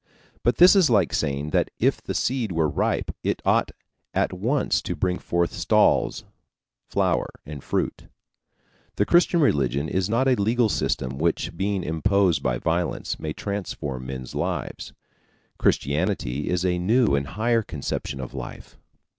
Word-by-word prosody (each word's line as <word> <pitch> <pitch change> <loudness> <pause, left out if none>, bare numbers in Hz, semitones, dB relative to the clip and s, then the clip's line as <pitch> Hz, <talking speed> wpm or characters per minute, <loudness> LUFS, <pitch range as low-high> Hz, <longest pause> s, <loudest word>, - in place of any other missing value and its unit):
But 120 -1 +1
this 180 +3 +8
is 185 -7 +5
like 100 - +3
saying 70 +2 -1
that - - +1
if - - +1
the - - -5
seed 125 -5 0
were 80 -2 +1
ripe 70 - -1
it - - 0
ought - - +3 0.5
at - - +1
once 120 +10 0
to - - -4
bring 90 -1 -1
forth 85 0 -1
stalls, - - +2 0.7
flower, - - +1 0.2
and 70 -2 -8
fruit. - - -2 0.9
The 105 - +2
Christian 175 +2 +4
religion 70 - +1
is 95 +3 -1
not 120 +4 +2
a 130 - +5
legal 115 +1 +2
system 65 -8 -1
which, 85 +1 0
being 95 -1 -1
imposed 85 0 +2
by 65 -2 0
violence, 85 +6 -2
may 75 -1 -4
transform 75 -11 -5
men's 65 -1 -6
lives. - - -3 0.7
Christianity 75 -3 0
is 90 0 0
a 90 -1 +1
new 110 - +3
and 70 0 0
higher 115 +6 +1
conception 70 -5 -4
of 65 - -6
life. - - -9
90 Hz, 150 wpm, -24 LUFS, 70-110 Hz, 0.9 s, this